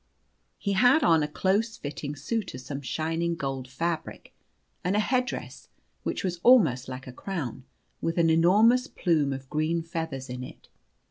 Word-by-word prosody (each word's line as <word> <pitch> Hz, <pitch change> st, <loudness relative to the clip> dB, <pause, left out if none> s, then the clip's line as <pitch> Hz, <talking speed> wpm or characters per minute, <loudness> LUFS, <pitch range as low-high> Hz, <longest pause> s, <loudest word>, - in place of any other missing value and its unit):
He 200 Hz, -, -2 dB
had 250 Hz, +9 st, +5 dB
on 165 Hz, -8 st, +5 dB
a 150 Hz, -, 0 dB
close 200 Hz, +8 st, 0 dB
fitting 145 Hz, 0 st, -5 dB
suit 220 Hz, -, -3 dB
of 130 Hz, -, -7 dB
some 140 Hz, +2 st, -6 dB
shining 165 Hz, +5 st, -1 dB
gold 135 Hz, -4 st, -4 dB
fabric, 160 Hz, +5 st, -4 dB, 0.5 s
and 185 Hz, +3 st, +1 dB
a -, -, +3 dB
headdress, 250 Hz, +2 st, -2 dB, 0.3 s
which -, -, -3 dB
was 180 Hz, -2 st, -2 dB
almost 160 Hz, -, +5 dB
like 130 Hz, 0 st, -7 dB
a 130 Hz, -, -9 dB
crown, 135 Hz, -, -5 dB, 0.4 s
with 165 Hz, +1 st, -1 dB
an 165 Hz, -1 st, +4 dB
enormous 215 Hz, +10 st, +5 dB
plume 155 Hz, -, +1 dB
of 135 Hz, 0 st, -5 dB
green 155 Hz, +3 st, 0 dB
feathers 160 Hz, -5 st, -4 dB
in 125 Hz, 0 st, -6 dB
it. -, -, -12 dB
165 Hz, 160 wpm, -27 LUFS, 135-195 Hz, 0.5 s, had